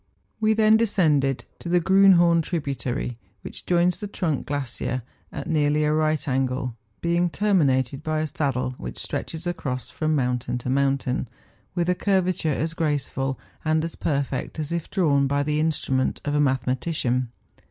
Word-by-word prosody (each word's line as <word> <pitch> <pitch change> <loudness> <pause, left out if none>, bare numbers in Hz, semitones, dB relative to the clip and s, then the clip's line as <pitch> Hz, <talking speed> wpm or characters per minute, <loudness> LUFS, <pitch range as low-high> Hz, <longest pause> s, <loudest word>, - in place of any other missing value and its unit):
We 220 0 +3
then 220 0 +5
descended 155 - +2
to 170 - -6
the 175 +1 +4
Grriinliorn 175 -2 +5
tributary, 135 -7 -3 0.2
which - - -9
joins 175 0 +2
the 205 - -4
trunk 165 -8 -2
glacier 130 -3 -3 0.3
at - - -6
nearly 150 -1 +2
a 150 0 +2
right 155 -1 +1
angle, 130 -2 -1 0.3
being 170 +1 +2
terminated 140 -10 +1
by 155 0 -1
a - - 0
saddle 135 -5 -1
which - - -6
stretches 165 +1 -3
across 140 -8 -3
from 155 0 0
mountain 125 -2 -1
to 125 +1 -3
mountain, 135 -2 +1 0.5
with 175 -1 0
a 180 - +3
curvature 185 -4 +1
as 160 +3 -1
graceful 140 -4 -1 0.2
and 155 0 +1
as 165 - -3
perfect 140 -2 -2
as 155 0 -3
if 170 -2 -3
drawn 145 -7 +2
by 140 +1 +1
the 150 +1 0
instru¬ 160 -3 -1
ment 130 0 +1
of 145 - -1
a 150 - +2
mathematician. 130 -1 0
150 Hz, 160 wpm, -24 LUFS, 135-170 Hz, 0.5 s, then